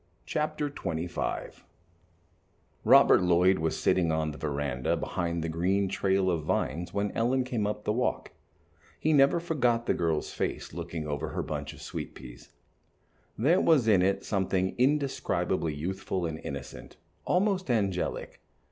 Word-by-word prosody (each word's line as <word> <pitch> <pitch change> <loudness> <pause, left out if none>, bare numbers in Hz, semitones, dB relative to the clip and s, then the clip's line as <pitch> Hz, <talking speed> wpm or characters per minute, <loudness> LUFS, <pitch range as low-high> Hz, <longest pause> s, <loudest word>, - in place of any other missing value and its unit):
Chapter 155 -1 -1
XXV 85 - -4 1.2
Robert - - +7
Lloyd 90 +1 +4
was 80 0 -1
sitting 85 -3 +2
on 80 -1 0
the 75 - -10
veranda 70 -4 -1
behind 85 -1 -2
the - - -2
green 90 +5 +1
trail 95 0 +1
of 85 -2 -1
vines 80 +3 -2
when 100 0 -1
Ellen 125 +3 +1
came 120 -5 -1
up 105 0 -4
the 105 - 0
walk. 125 +2 -1 0.7
He 155 - +2
never 140 +3 +5
forgot 125 -9 +1
the - - +2
girl's 80 -2 -1
face - - -3
looking 85 -1 -5
over 75 -1 -3
her - - -3
bunch - - -4
of - - -12
sweet - - -6
peas. - - -12 0.9
There 160 - +3
was 145 -8 +4
in 100 -5 +5
it 95 +1 +1
something 95 -2 0
indescribably 135 - 0
youthful 95 +3 -3
and 80 -1 -4
innocent, 70 0 -8 0.3
almost 185 -2 +1
angelic. 100 -6 -1
95 Hz, 145 wpm, -29 LUFS, 80-125 Hz, 1.2 s, Robert